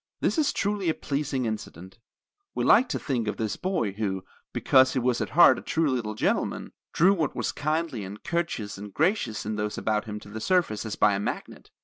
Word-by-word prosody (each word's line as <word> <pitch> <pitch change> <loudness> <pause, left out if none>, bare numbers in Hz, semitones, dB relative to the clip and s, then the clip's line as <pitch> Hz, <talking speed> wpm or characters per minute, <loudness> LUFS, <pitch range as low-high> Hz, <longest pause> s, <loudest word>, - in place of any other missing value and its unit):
This - - +1
is 295 - +2
truly 200 -3 -1
a 160 - +1
pleasing 140 -3 -2
incident. 105 -3 -6 0.6
We - - 0
like 255 - +5
to - - -1
think 125 -6 -2
of 105 - -2
this 110 -2 -2
boy 180 - -1
who, 95 -2 -3 0.3
because 130 0 +4
he 130 - +1
was 125 -1 0
at - - -2
heart 175 - +8
a - - -10
true 160 -3 0
little 110 -4 -2
gentleman, - - -1 0.2
drew 185 +5 +4
what 160 -7 -1
was - - -1
kindly 155 -6 -2
and 100 +2 -9
courteous 130 - -2
and 105 0 -8
gracious 155 - 0
in 105 0 -3
those 105 0 -2
about 110 +1 0
him 105 -1 -5
to - - -12
the 110 +1 -7
surface 115 - +1
as 105 - -4
by 105 - +4
a 100 - -1
magnet. 100 - -5
120 Hz, 215 wpm, -26 LUFS, 105-165 Hz, 0.6 s, heart